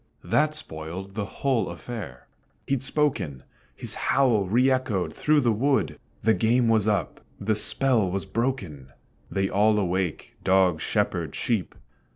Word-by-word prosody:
That 155 0 +1
spoiled 90 - -7
the 105 0 -3
whole 130 +2 -1
affair 100 - -8 0.4
he'd 135 -2 0
spoken; 130 - 0 0.3
His - - +1
howl 125 -7 +2
re 120 +8 +3
echoed 130 -8 0
through 150 -1 +2
the 120 -3 +2
wood. 135 +6 0 0.2
The 110 +2 +4
game 120 +2 +2
was 110 -2 +3
up 105 -2 -1 0.2
the 105 +2 0
spell 115 -1 +2
was 95 +1 -3
broken! 95 - -3 0.4
They 95 0 0
all 105 +2 +3
awake, 95 -3 -2
dog, 95 -4 +3
Shepherd, - - -1
sheep. 110 -6 -1
110 Hz, 140 wpm, -25 LUFS, 95-130 Hz, 0.4 s, The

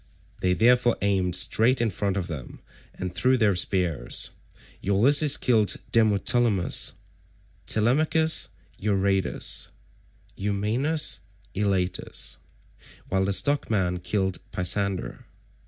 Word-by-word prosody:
They 90 0 +1
therefore 120 +3 +3
aimed 95 -3 +1
straight 110 +7 +2
in 115 -2 0
front 100 +3 -2
of 95 - -2
them 75 -7 -8 0.4
and 90 -1 -5
threw 130 +7 +2
their 105 -5 +2
spears. 90 -3 0 0.5
Ulysses 140 +9 +4
killed 110 -6 +2 0.2
Demoptolemus, 110 -2 +2 0.7
Telemachus 155 +8 +2 0.3
Euryades, 95 -2 0 0.7
Eumaeus 110 +10 -1 0.3
Elatus, 95 -2 -2 0.7
while 95 0 +1
the 100 - 0
stockman 95 -7 +1
killed 95 0 -2
Pisander. 95 +1 -1
100 Hz, 90 wpm, -25 LUFS, 95-120 Hz, 0.7 s, Ulysses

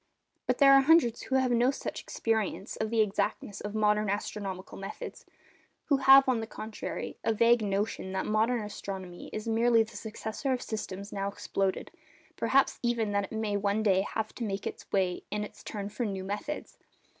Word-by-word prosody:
But 250 - +2
there 275 -1 +7
are 275 - +8
hundreds 270 -5 +4
who 265 - -2
have 260 -1 +3
no 240 +1 +4
such 275 - -4
experience 220 -3 -2
of 220 - -2
the 225 -1 +3
exactness 205 0 -1
of 205 +1 -5
modern 210 -1 +2
astronomical 195 -2 -4
methods—who 195 +7 -6
have, 270 0 +8
on 255 -3 +2
the 225 - -4
contrary, 220 -1 -6
a - - +2
vague 235 +2 +5
notion 200 -1 -1
that 190 - -1
modern 220 +2 +1
astronomy 190 -3 -7
is 215 +1 -5
merely 230 0 +4
the 220 -1 -13
successor 220 +5 -3
of 250 - -2
systems 200 -2 -5
now 195 0 -2
exploded; 195 -1 -2 0.4
perhaps 275 0 +2
even 235 -3 0
that 200 0 +1
it - - -15
may 220 -2 -1
one 205 +1 +1
day 190 -3 +4
have 215 +2 -3
to 240 - -5
make 200 -2 -3 0.3
way 185 -2 +1
in 210 0 -2
its 210 - -10
turn 200 -2 -5
for 215 +4 -4
new 195 -4 -3
methods. 205 +10 -5
215 Hz, 180 wpm, -29 LUFS, 200-235 Hz, 0.4 s, are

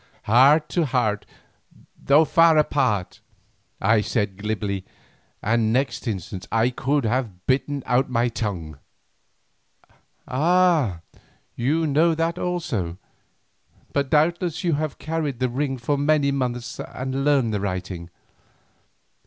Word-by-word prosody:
"Heart 140 +8 +5
to 170 -3 +1
heart, 110 -6 0 0.7
Though 150 +3 +4
far 165 0 +5
apart," 110 -11 0 0.6
I 110 +2 +3
said 105 -3 -1
glibly, 100 -1 -3 0.6
and 110 0 +1
next 125 0 -1
instant 95 -2 -5
I 115 +2 +2
could 140 +3 0
have 110 -6 -2
bitten 140 +1 0
out 125 +2 +1
my 120 -1 +1
tongue. 90 - -4 1.5
"Ah! 155 - +2 0.5
you 150 +7 0
know 160 +3 +3
that 165 +2 -1
also, 120 - -2 1.0
but 140 -1 0
doubtless 170 +3 +1
you 170 -2 +1
have 150 0 -2
carried 155 -4 -3
the 130 +1 0
ring 135 +2 -2
for 140 +4 -1
many 145 -1 +2
months 125 -3 -3
and 130 +1 -4
learned 135 -6 +2
the 100 - -1
writing. 90 -3 -4
130 Hz, 120 wpm, -23 LUFS, 110-150 Hz, 1.5 s, Heart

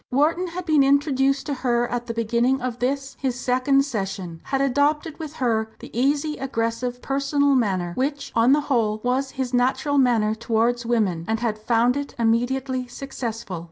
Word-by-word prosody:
Wharton 320 +7 +2
had 355 +1 -6
been 310 -4 +4
introduced 275 -1 +2
to 290 - -2
her 240 -2 0
at 240 0 -3
the 230 - -3
beginning 235 +3 +1
of 250 -1 -4
this, 275 +2 -2
his 255 -2 -2
second 260 +2 +2
session, 195 - -4
had 270 - -1
adopted 290 +4 +1
with 310 -2 -6
her 225 -5 0
the - - -12
easy, 285 +4 +1
aggressive, 245 -1 -2
"personal" 280 +1 +1
manner 190 -8 0
which, 285 +6 -2
on 230 +3 +4
the 295 +2 +4
whole, 225 -7 0
was 260 +2 0
his 260 -1 -2
natural 265 +4 +2
manner 230 -5 +3
towards 230 +2 0
women 205 -8 +1
and 225 0 0
had 220 -3 -1
found 235 +3 +2
it 285 0 -4
immediately 250 +3 0
successful. 230 -8 -5
250 Hz, 170 wpm, -23 LUFS, 230-275 Hz, -, been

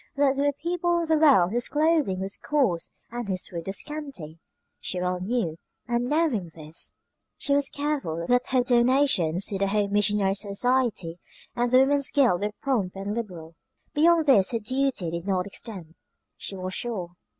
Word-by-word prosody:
That 280 -1 +3
there 280 +1 +1
were 285 - +1
people 345 +3 -1
in 335 - -3
the 315 -1 +4
world 195 - +6
whose 240 +2 0
clothing 300 - +1
was 195 +1 -2
coarse 255 - 0 0.2
and 240 -2 -5
whose 185 -2 -2
food 170 -1 -7
was 195 - -1
scanty, 275 - -7 0.4
she 180 - -4
well 180 0 -1
knew; 185 -5 -2 0.3
and 240 0 0
knowing 295 - +1
this 155 0 -6 0.4
she 280 - -1
was 280 -1 +3
careful 280 - -2
that 245 +3 +2
her 255 -1 +2
donations 240 - +2
to 195 - -1
the 195 - +1
Home 200 0 0
Missionary 205 -1 +2
Society 200 -3 -1 0.4
and 240 0 0
the 255 +1 +7
Woman's 280 0 +3
Guild 240 -11 +3
were 210 - 0
prompt 220 -10 0
and 195 +2 -4
liberal. 180 -8 -6 0.4
Beyond 325 +1 +4
this 210 -10 +5
her 230 - -1
duty 255 -6 -1
did 170 +2 -5
not 185 -2 0
extend, 195 -5 -6 0.4
she 195 - -6
was 185 0 -5
sure. 195 -8 -4
225 Hz, 175 wpm, -26 LUFS, 185-275 Hz, 0.4 s, the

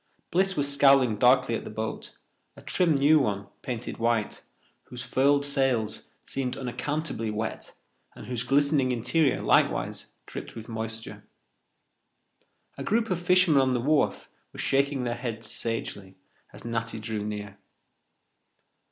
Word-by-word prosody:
Bliss 190 +2 +2
was 140 -1 +1
scowling 135 -5 +5
darkly 125 +1 +4
at - - -2
the - - -7
boat, 110 +1 -5 0.4
a - - -11
trim 170 -4 +2
new 145 +3 +5
one, 100 -7 -1 0.2
painted 120 -2 -5
white, 115 -2 0 0.4
whose 125 0 -8
furled 140 +2 +2
sails 135 -6 0 0.2
seemed 130 -2 -3
unaccountably 135 -1 -3
wet 110 +1 -4 0.4
and - - -10
whose 120 0 -3
glistening 140 0 +2
interior 135 +5 +1
likewise - - +1 0.2
dripped - - -8
with 115 -1 -8
moisture. 115 0 -6 1.6
A - - -3
group 225 0 0
of 175 -1 -1
fishermen 180 -5 +4
on 130 -1 +2
the - - +1
wharf 145 +5 +1 0.3
were - - -12
shaking 140 -1 +1
their 120 -1 -1
heads 115 -2 -4
sagely 100 -4 -4 0.4
as - - -12
Natty 115 -1 -3
drew 110 -1 -4
near. 105 -1 -6
125 Hz, 135 wpm, -27 LUFS, 115-140 Hz, 1.6 s, scowling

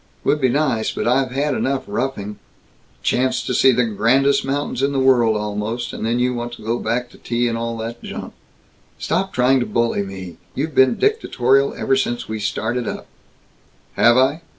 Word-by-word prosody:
"Would 150 - +1
be 130 - +3
nice, 130 -4 0
but - - -3
I've 130 +2 +2
had 140 +3 -1
enough 135 0 -1
roughing 105 -6 -3 0.3
" - - -35
"Chance 130 +1 +1
to - - -2
see 130 - +5
the 125 0 +2
grandest 130 +6 +2
mountains 135 -1 -2
in 140 +1 +1
the 135 - 0
world, 120 -4 +4
almost, 105 +3 -3
and - - -6
then 115 +1 +1
you 125 +1 +1
want 120 0 -4
to 120 - -11
go 115 +2 0
back 120 +1 -2
to - - -17
tea 120 +1 -1
and 115 - -1
all 115 0 -3
that 115 +1 -6
junk!" - - -7 0.6
"Stop 190 +4 -1
trying 130 +2 +3
to 120 - -2
bully 115 -3 0
me! 95 -4 -7 0.2
You 140 - 0
have 160 - -10
been 130 -1 +4
dictatorial 135 - +2
ever 135 - +1
since 120 -2 -1
we 110 0 -4
started 110 +3 -2
up - - -5 0.5
" - - -36
"Have 120 +1 +5
I? 135 +5 +2
125 Hz, 200 wpm, -20 LUFS, 115-135 Hz, 0.6 s, see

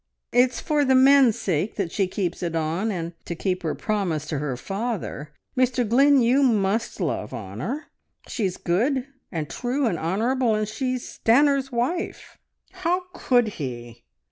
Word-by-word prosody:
It's 245 -1 +3
for 300 -2 +1
the 265 -1 +3
men's 265 -3 +6
sake 185 +2 -1
that 190 -5 -2
she 195 -2 +1
keeps 180 -2 -3
it 170 -2 -2
on, 165 +7 -1
and 170 -3 -4
to 170 - -4
keep 185 +1 -1
her 160 -3 -2
promise 185 -8 -1
to 150 - -1
her 135 -4 -3
father. 195 - -4 0.2
Mr 255 -2 +2
Glynn, 270 +3 +5
you 250 +4 +4
must 220 -4 +1
love 150 - -2
Honor. 115 - -5 0.4
She's 195 -6 -2
good, 245 +9 0 0.3
and 160 -5 -3
true, 260 - -1
and 175 -8 0
honourable, 225 +7 +1
and 215 0 -1
she's 255 +3 -3 0.2
Stanor's 275 +3 +4
wife!" 255 +9 -3 0.3
"How 365 -1 -1
could 245 -3 +2
he? 120 -4 -6
220 Hz, 155 wpm, -24 LUFS, 170-260 Hz, 0.4 s, men's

